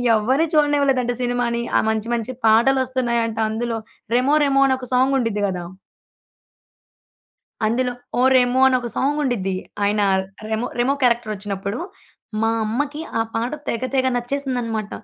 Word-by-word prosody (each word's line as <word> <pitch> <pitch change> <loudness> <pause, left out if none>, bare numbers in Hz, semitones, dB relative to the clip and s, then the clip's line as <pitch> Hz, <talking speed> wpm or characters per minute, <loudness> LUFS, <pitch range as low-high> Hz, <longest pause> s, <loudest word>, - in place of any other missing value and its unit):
ఎవరిని 260 +9 +2
చూడనివ్వలేదంట 280 -5 +2
సినిమాని. 245 -1 0
ఆ - - +4
మంచి, 220 +1 -2
మంచి 235 +2 -4
పాటలొస్తున్నాయంట 235 -1 +2
అందులో. 225 +1 -2 0.4
రెమో 265 +4 +3
రెమో 275 -1 +3
అని 260 - +2
ఒక 250 - -7
సాంగ్ 265 +2 +3
ఉండిద్ది 215 -4 -1
కదా! 180 -2 -4 2.0
అందులో 245 +3 0 0.3
'ఓ - - +3 0.2
రెమో' 250 +1 +3
అని 260 - +3
ఒక 240 - -4
సాంగ్ 290 +3 +1
ఉండిద్ది. 195 -8 -1 0.3
ఆయన 205 +1 +2 0.5
రెమో 220 +2 -1
రెమో 260 +3 +2
క్యారెక్టర్ 235 -3 +2
ఒచ్చినప్పుడు 200 +1 -4 0.6
మా 225 - +2 0.2
అమ్మకి 290 +7 -2 0.2
ఆ - - +3
పాట 230 +2 -1 0.2
తెగ 230 - -2
తెగ 260 -1 +2
నచ్చేసిందనమాట. 245 -4 -2
245 Hz, 135 wpm, -21 LUFS, 220-260 Hz, 2.0 s, ఆ